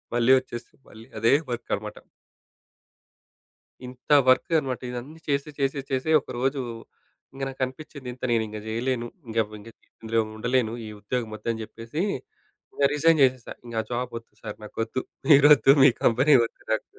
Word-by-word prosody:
మళ్ళీ 120 Hz, +1 st, +4 dB
ఒచ్చేసి 120 Hz, -2 st, -9 dB, 0.2 s
మళ్ళీ 110 Hz, +1 st, -13 dB
అదే 115 Hz, +4 st, +4 dB, 0.2 s
వర్క్ 120 Hz, -, -5 dB
అన్నమాట. -, -, -8 dB, 1.9 s
ఇంత 125 Hz, 0 st, -14 dB, 0.2 s
వర్క్ 130 Hz, -, +3 dB
అన్నమాట 130 Hz, -4 st, -4 dB
ఇదన్నీ 125 Hz, +6 st, -7 dB
చేసి 140 Hz, +1 st, 0 dB
చేసి 135 Hz, 0 st, 0 dB
చేసి 130 Hz, +3 st, -1 dB
ఒకరోజు 130 Hz, +3 st, -2 dB, 0.7 s
ఇంగ 135 Hz, -, -10 dB
నాకు 135 Hz, 0 st, -10 dB
అనిపిచింది 130 Hz, 0 st, -9 dB
ఇంత 125 Hz, -, -18 dB
నేను 115 Hz, -1 st, +2 dB
ఇంగ 105 Hz, 0 st, -7 dB
జేయలేను. 120 Hz, +2 st, -2 dB, 0.2 s
ఇంగ 115 Hz, 0 st, -6 dB, 0.2 s
ఇంగా 115 Hz, +3 st, -12 dB, 0.3 s
ఇందులో 115 Hz, 0 st, 0 dB, 0.2 s
ఉండలేను 120 Hz, 0 st, 0 dB
ఈ -, -, -7 dB
ఉద్యోగం 115 Hz, +2 st, -3 dB
ఒద్దు 115 Hz, -, -5 dB
అని 115 Hz, -1 st, -5 dB
జెప్పేసి 115 Hz, +8 st, -6 dB, 0.7 s
ఇంగా 140 Hz, -1 st, +3 dB
రిజైన్ 160 Hz, +2 st, +4 dB
జేసేసా. 130 Hz, -2 st, +1 dB
ఇంగా 115 Hz, -2 st, -2 dB
జాబ్ 125 Hz, 0 st, -3 dB
ఒద్దు 115 Hz, -, -29 dB
సార్! 105 Hz, -2 st, -6 dB
నాకొద్దు 115 Hz, +4 st, -4 dB, 0.3 s
మీరోద్దు 145 Hz, -1 st, +7 dB
మీ 140 Hz, -, +9 dB
కంపెనీ 135 Hz, +5 st, +5 dB
ఒద్దు -, -, -12 dB
నాకు. 110 Hz, -, 0 dB
125 Hz, 150 wpm, -25 LUFS, 115-135 Hz, 1.9 s, మీ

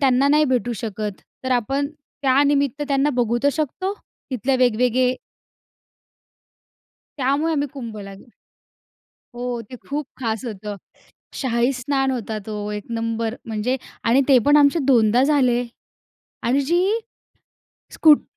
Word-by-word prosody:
त्यांना 270 Hz, 0 st, +4 dB
नाही 300 Hz, +1 st, +5 dB
भेटू 245 Hz, -1 st, 0 dB
शकत. 215 Hz, -3 st, -4 dB, 0.3 s
तर 260 Hz, -, -2 dB
आपण 270 Hz, +4 st, 0 dB, 0.4 s
त्यानिमित्त 280 Hz, +1 st, +2 dB
त्यांना 280 Hz, +1 st, +2 dB
बघू 240 Hz, -1 st, +1 dB
तर 285 Hz, -, +4 dB
शकतो 370 Hz, +7 st, -2 dB, 0.4 s
तिथल्या 260 Hz, +2 st, 0 dB
वेगवेगळे 250 Hz, +1 st, +3 dB, 2.0 s
त्यामुळे 280 Hz, +5 st, +1 dB
आम्ही 290 Hz, -2 st, 0 dB
कुंभला 215 Hz, -7 st, -7 dB
गे 195 Hz, +6 st, -16 dB, 1.1 s
हो, 245 Hz, 0 st, -3 dB
ते 255 Hz, -, -7 dB
खूप 290 Hz, 0 st, -2 dB
खास 225 Hz, -1 st, -2 dB
होतं. 210 Hz, -3 st, -5 dB, 0.6 s
शाहीस्नान 260 Hz, +2 st, 0 dB
होतं 225 Hz, -4 st, -3 dB
तो, 210 Hz, -1 st, -4 dB
एक 210 Hz, -1 st, -5 dB
नंबर 230 Hz, 0 st, -2 dB
म्हणजे 225 Hz, +3 st, -1 dB, 0.3 s
आणि 245 Hz, +4 st, +4 dB
ते 265 Hz, -2 st, +7 dB
पण 290 Hz, +1 st, +6 dB
आमचे 285 Hz, +2 st, +5 dB
दोनदा 240 Hz, -2 st, +4 dB
झाले 260 Hz, -4 st, +3 dB, 0.8 s
आणि 255 Hz, +4 st, +2 dB
जी 340 Hz, +6 st, +2 dB, 1.1 s
स्कूट 305 Hz, -2 st, +6 dB
255 Hz, 120 wpm, -22 LUFS, 230-280 Hz, 2.0 s, ते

